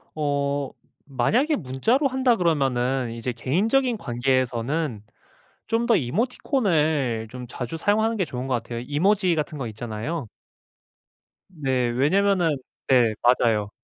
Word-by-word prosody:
어 140 -2 -1 0.3
만약에 225 - +1
문자로 205 - +1
한다 260 -2 +2
그러면은 135 - 0
이제 115 +2 -4
개인적인 220 - +1
관계에서는 130 - -1 0.7
좀 230 +1 +1
더 235 -3 +4
이모티콘을 155 - 0
좀 125 +1 -8
자주 125 +3 -5
사용하는 220 +6 +1
게 195 - 0
좋은 130 -5 -5
것 130 - -1
같아요. 115 0 -4
이모지 185 +4 +2
같은 150 0 -3
거 130 -4 -4
있잖아요. 115 +6 -5 1.2
네. 135 -8 -1
왜냐하면은 165 +5 +2 0.3
네. 120 -4 +4
맞아요. 115 -4 +3
140 Hz, 280 characters per minute, -24 LUFS, 125-195 Hz, 1.2 s, 더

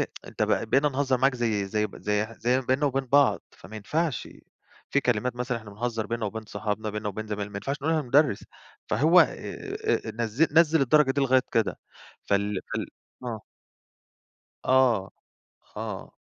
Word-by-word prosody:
إيه، - - +1 0.2
أنت - - -4
ب 110 - 0
بقينا 140 +2 +4
نهزر 135 -1 0
معاك 135 +1 +3
زي 110 -5 0
زي 105 +2 0
ب - - -13
زي 105 +1 0
زي 125 +2 +2
ما 130 - -12
بيننا 135 +3 +2
وبين 135 -1 -1
بعض، 140 +1 +4
فما 110 - -12
ينفعش، 155 +7 -2 0.6
في 140 - +3
كلمات 125 0 0
مثلًا 125 -1 -2
إحنا 110 -2 -12
بنهزر 115 +1 -3
بيننا 115 -2 -2
وبين 110 +2 -5
صحابنا، 105 +1 -3
بيننا 105 0 -4
وبين 110 +2 -5
زمايلنا، 105 -1 -4
ما - - -6
ينفعش 135 +8 -3
نقُولها 160 0 +1
لمدرّس، 135 -3 +2 0.4
فهو 165 +5 +5
آآ، 425 +2 -1
نزِّل 115 +7 +1
نزِّل 160 0 +5
الدرجة 140 +1 +4
دي 140 +1 0
لغاية 130 -1 +4
كده، 115 -2 +1 0.4
فال 100 -1 0
فال - - -2 0.4
آه. 115 -3 -4 1.2
آه، 125 -7 +3 0.7
آه - - -6
125 Hz, 165 wpm, -26 LUFS, 105-140 Hz, 1.2 s, فهو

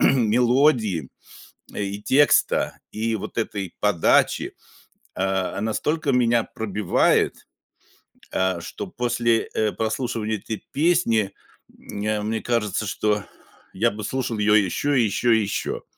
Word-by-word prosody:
мелодии 120 - +3 0.7
и 100 0 -4
текста, 145 +5 +3
и 110 +1 -1
вот 105 - -6
этой 100 -5 -3
подачи, 105 -5 +2 0.6
э, 95 0 -1
настолько 145 +7 -1
меня 120 -2 +3
пробивает, 105 -3 0 0.9
э, 95 -2 0
что 200 - -6
после, 120 -7 0
э, 110 -1 +1
прослушивания 110 -1 -2
этой 110 +2 -6
песни, 140 - +2 0.4
э, 105 +1 -4
мне 110 +1 -2
кажется, 110 -3 -1
что 105 +1 0 0.5
я 115 +5 +2
бы 105 +1 -7
слушал 120 -1 -2
ее 105 0 +4
еще, 135 +7 +1
еще 115 +2 +2
и - - +1
еще. 100 - -3
110 Hz, 115 wpm, -23 LUFS, 105-120 Hz, 0.9 s, ее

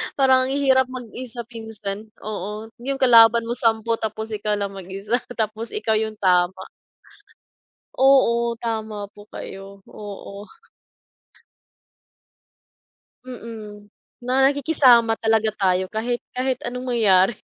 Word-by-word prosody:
parang 260 -2 +4
ang 265 - -2
hirap 265 -2 +3
mag-isa 245 -1 -7
minsan. 220 -2 -6
Oo, 210 +1 -6 0.2
yung 275 0 -3
kalaban 230 -2 +6
mo 240 - -2
10 230 0 +1
tapos 220 0 -4
ikaw 210 -1 -2
lang 200 -1 -2
mag-isa, 195 +5 -3 0.2
tapos 220 0 -3
ikaw 225 - 0
yung 220 0 -2
tama. 185 0 +2 1.4
Oo, 235 -3 +4
tama 220 -3 -4
po 205 0 -16
kayo. 195 0 -10
Oo. 205 0 -9 2.8
Mm. 220 -4 -9 0.4
Na 250 +1 -2
nakikisama 265 -5 +4
talaga 220 -1 +2
tayo 185 -1 +1
kahit 240 +3 -2
kahit 255 0 -1
anong 250 +1 -5
mangyari. 195 -2 +4
225 Hz, 110 wpm, -22 LUFS, 205-245 Hz, 2.8 s, kalaban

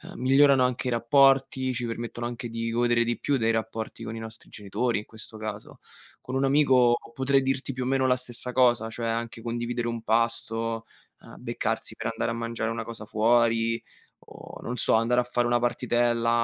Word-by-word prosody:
migliorano 135 +1 +4
anche 125 0 -1
i - - -2
rapporti, 130 +1 +3
ci 120 0 -3
permettono 120 0 -5
anche 120 0 -6
di 115 0 -3
godere 120 0 +2
di 120 0 -2
più 145 - 0
dei 115 -1 +1
rapporti 110 0 -4
con 110 - -5
i - - -6
nostri 110 0 -10
genitori, 105 +2 -2
in 105 - -9
questo 110 0 -10
caso. 110 0 -7 0.4
Con 130 - -6
un 135 +1 +2
amico 130 -4 +4 0.2
potrei 135 +2 +2
dirti, 135 +1 -2
più 130 0 -3
o 125 - -3
meno, 130 0 +2
la 125 - +4
stessa 125 0 -4
cosa, 120 -3 +3
cioè 115 0 -4
anche 115 0 -3
condividere 120 +1 -3
un 115 -1 -4
pasto, 115 0 0 0.4
ehm, - - -14
beccarsi - - -1
per - - -3
andare 115 - -2
a - - -3
mangiare 115 -1 -3
una 115 0 -3
cosa 115 -1 -8
fuori 115 +1 +2 0.5
o, - - -11
non 125 +1 -5
so, - - +3
andare 115 +2 +3
a - - -3
fare 120 0 0
una 120 0 +2
partitella, 120 -1 +1
120 Hz, 195 wpm, -26 LUFS, 115-125 Hz, 0.5 s, migliorano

